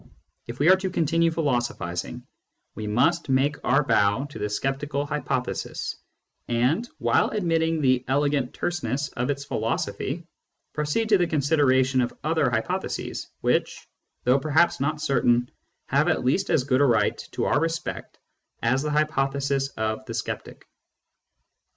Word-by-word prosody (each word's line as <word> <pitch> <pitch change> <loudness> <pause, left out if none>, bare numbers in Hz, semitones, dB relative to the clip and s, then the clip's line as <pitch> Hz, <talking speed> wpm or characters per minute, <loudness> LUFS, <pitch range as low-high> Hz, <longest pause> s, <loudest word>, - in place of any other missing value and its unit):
If 120 +1 -7
we 145 - +2
are - - +8
to 190 0 -3
continue 165 -1 +2
philosophising, 120 - -2 0.5
we 110 - -6
must 140 +10 +1
make 135 +3 +1
our 135 +4 +3
bow 105 -2 +2
to - - -8
the 105 - -2
sceptical 140 +5 -2
hypothesis, 145 -3 -3 0.5
and, 130 - +1
while - - +2
admitting 165 -5 0
the 130 -2 +3
elegant 140 -1 +1
terseness 140 -5 -2
of 120 +2 -3
its 140 0 -2
philosophy, 125 +8 -2 0.5
proceed 150 +9 -1
to 205 -3 +5
the 175 - +2
con 155 -3 0
sideration 130 -3 +3
of 120 - -5
other 155 -3 +2
hypotheses 110 -2 -3
which, - - 0 0.4
though 125 +3 +4
perhaps 155 +4 +2
not 150 +3 -1
certain, 120 -4 +2 0.3
have - - +2
at - - +1
least 190 +10 +1
as 135 - +3
good 130 0 +2
a - - +6
right 120 -4 +2
to - - -1
our 140 - +2
respect 165 +1 -3 0.5
as 130 +3 +2
the 150 - -2
hypothesis 140 -2 0
of 110 +2 -2
the 115 - -5
sceptic. - - -5
140 Hz, 145 wpm, -25 LUFS, 125-155 Hz, 0.5 s, are